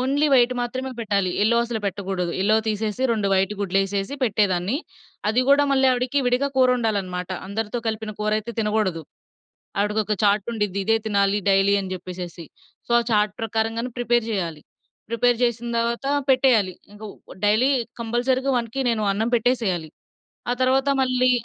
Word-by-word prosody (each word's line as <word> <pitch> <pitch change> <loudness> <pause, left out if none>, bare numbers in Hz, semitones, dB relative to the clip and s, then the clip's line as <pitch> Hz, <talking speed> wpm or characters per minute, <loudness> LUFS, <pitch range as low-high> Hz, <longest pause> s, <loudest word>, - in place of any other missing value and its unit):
Only 280 +4 +1
white 250 0 +4
మాత్రమే 260 +2 -3
పెట్టాలి. 200 -4 0
Yellow 235 +2 +3
అసలు 230 -2 -4
పెట్టగూడదు. 190 -3 -3
ఎల్లో 215 +2 +3
తీసేసి 215 +3 -2
2 210 -3 0
వైటు 195 +2 +2
గుడ్లేసేసి 195 +4 -1
పెట్టేదాన్ని. 200 -1 +1 0.5
అది 235 +4 +2
గూడా 285 +1 +5
మళ్ళీ 265 -1 +3
ఆవిడికి 250 +3 0
విడిగా 250 +3 +1
కూరొండాలనమాట. 210 -8 +1 0.2
అందరితో 220 +3 -3
కలిపిన 220 -1 -3
కూరైతే 215 +2 -1
తినగోడదు. 210 -6 0 0.8
ఆవిడకొక 210 +1 0
చార్టుండిద్ది, 205 -1 0
ఇదే 225 +3 +3
తినాలి 200 -1 +2
డైలీ 195 +1 +4
అని 190 -1 -5
చెప్పేసేసి. 180 -2 -7 0.4
సో, - - -3
ఆ - - -1
చార్ట్ 210 -1 +2
ప్రకారంగానే 225 +2 -2
ప్రిపేర్ 240 -1 +1
జెయ్యాలి. 170 -7 -3 0.5
ప్రిపేర్ 240 +1 +2
జేసిన 235 0 0
తర్వాత 235 +3 -1 0.2
పెట్టేయాలి. 250 -8 +3 0.2
ఇంక 210 +1 -14 0.3
వ్ - - -11
డైలీ 220 +6 +3 0.3
కంపల్సరీగా 255 +4 0
1కి 235 +3 -4
నేను 225 -2 -1
అన్నం 220 +4 -1
పెట్టేసెయ్యాలి. 220 -9 0 0.6
ఆ - - +3
తర్వాత 265 +2 +2
మళ్ళీ 255 -1 +2
220 Hz, 145 wpm, -23 LUFS, 200-245 Hz, 0.8 s, గూడా